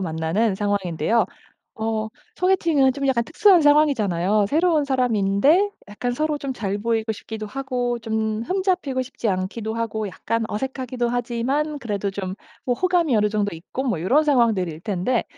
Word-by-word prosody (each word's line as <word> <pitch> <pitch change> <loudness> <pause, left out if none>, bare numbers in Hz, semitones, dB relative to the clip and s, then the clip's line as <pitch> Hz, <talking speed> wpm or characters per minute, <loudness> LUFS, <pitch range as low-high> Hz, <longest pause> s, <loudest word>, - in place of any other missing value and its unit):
만나는 170 +5 0
상황인데요. 205 +1 0 0.5
어 220 0 -1 0.3
소개팅은 335 -8 +3
좀 280 +1 -4
약간 235 -3 +2
특수한 370 - +5
상황이잖아요. 215 - +3
새로운 320 -1 +2
사람인데 255 - +2 0.2
약간 245 +4 -3
서로 305 +3 -1
좀 275 -2 -4
잘 200 -3 -2
보이고 225 0 -1
싶기도 220 0 -6
하고 250 -1 -2
좀 220 -1 -2
흠 380 +1 -1
잡히고 330 -9 0
싶지 250 -3 -4
않기도 205 +4 -2
하고 220 -2 -2
약간 230 +4 -2
어색하기도 255 +1 -3
하지만 245 +5 -1
그래도 205 -3 -2
좀 190 -1 -4 0.3
어 250 - +2
호감이 345 -6 +2
어느 210 0 +3
정도 205 -4 -1
있고 190 +10 -5
뭐 235 -12 -1
요런 265 - +3
상황들일 220 - +1
텐데 210 +4 0
230 Hz, 355 characters per minute, -23 LUFS, 205-275 Hz, 0.5 s, 특수한